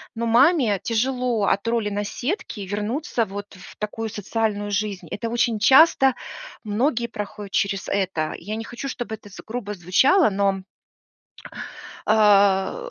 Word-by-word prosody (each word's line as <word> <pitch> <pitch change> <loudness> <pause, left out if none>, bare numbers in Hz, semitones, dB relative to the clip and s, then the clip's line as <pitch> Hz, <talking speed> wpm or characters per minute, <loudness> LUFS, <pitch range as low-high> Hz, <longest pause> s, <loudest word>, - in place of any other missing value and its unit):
но 230 +1 -2
маме 240 - +4
тяжело 245 -1 0
от 200 +3 0
роли 230 -2 0
наседки 210 - -3
вернуться 215 - -2
вот 205 0 -7
в 185 - -13
такую 220 +1 -4
социальную 205 -1 -2
жизнь. 200 -3 -2
Это 230 +2 -3
очень 235 -1 +1
часто, 270 +2 +6 0.5
многие 235 +3 0
проходят 210 -2 -7
через 195 -1 0
это. 185 -6 -1
Я 205 +5 -6
не 225 - -4
хочу, 240 +4 -6
чтобы 240 -3 -4
это 215 -1 -16
з 200 - -11
грубо 220 -2 -4
звучало, 240 - +4
но 195 -1 0 1.5
а, 205 - +3
215 Hz, 135 wpm, -23 LUFS, 200-240 Hz, 1.5 s, часто